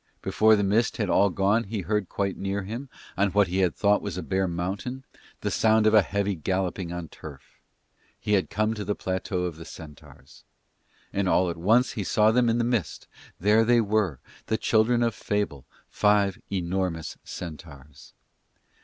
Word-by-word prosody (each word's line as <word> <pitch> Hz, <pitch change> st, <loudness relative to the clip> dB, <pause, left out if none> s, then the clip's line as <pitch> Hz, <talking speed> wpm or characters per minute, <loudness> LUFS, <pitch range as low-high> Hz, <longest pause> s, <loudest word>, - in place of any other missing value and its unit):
Before 110 Hz, 0 st, +4 dB
the 100 Hz, -, 0 dB
mist 105 Hz, +4 st, +1 dB
had 105 Hz, -5 st, -1 dB
all 100 Hz, -, +4 dB
gone 100 Hz, +5 st, +1 dB
he 100 Hz, 0 st, -4 dB
heard 105 Hz, 0 st, -1 dB
quite 100 Hz, -1 st, -2 dB
near 100 Hz, +1 st, -3 dB
him, 115 Hz, +8 st, -6 dB, 0.3 s
on 100 Hz, +1 st, +2 dB
what 100 Hz, -2 st, +3 dB
he 95 Hz, +2 st, -1 dB
had 90 Hz, -3 st, +2 dB
thought 105 Hz, 0 st, +2 dB
was 100 Hz, -4 st, -5 dB
bare 95 Hz, 0 st, -1 dB
mountain, 95 Hz, +10 st, -4 dB, 0.4 s
the -, -, -2 dB
sound 110 Hz, -1 st, +3 dB
of 110 Hz, -, +4 dB
a 110 Hz, -, +7 dB
heavy 100 Hz, +1 st, -1 dB
galloping 95 Hz, +1 st, -2 dB
on 85 Hz, -1 st, -5 dB
turf. 70 Hz, -2 st, -13 dB, 0.6 s
He 105 Hz, -, -1 dB
had 95 Hz, -2 st, +2 dB
come 110 Hz, +1 st, 0 dB
to 105 Hz, -2 st, -5 dB
the 105 Hz, +1 st, -2 dB
plateau 95 Hz, 0 st, -3 dB
of 85 Hz, -3 st, -4 dB
the 80 Hz, -, -9 dB
centaurs. 80 Hz, -3 st, -13 dB, 0.7 s
And 95 Hz, -1 st, 0 dB
all 90 Hz, -1 st, +3 dB
at -, -, -6 dB
once 115 Hz, +9 st, +3 dB
he 105 Hz, -, -4 dB
saw 105 Hz, +3 st, +3 dB
them 120 Hz, 0 st, +3 dB
in 115 Hz, -, +1 dB
the 120 Hz, -, +1 dB
mist: 115 Hz, -, -2 dB, 0.3 s
there 105 Hz, +4 st, +4 dB
they 120 Hz, +1 st, +4 dB
were, 105 Hz, -, +1 dB, 0.3 s
the 110 Hz, -, 0 dB
children 120 Hz, +2 st, +2 dB
of 115 Hz, -2 st, +1 dB
fable, 100 Hz, -13 st, -3 dB, 0.2 s
five 105 Hz, -2 st, +2 dB
enormous 90 Hz, -3 st, -2 dB
centaurs. 75 Hz, -5 st, -10 dB
100 Hz, 180 wpm, -26 LUFS, 90-110 Hz, 0.7 s, a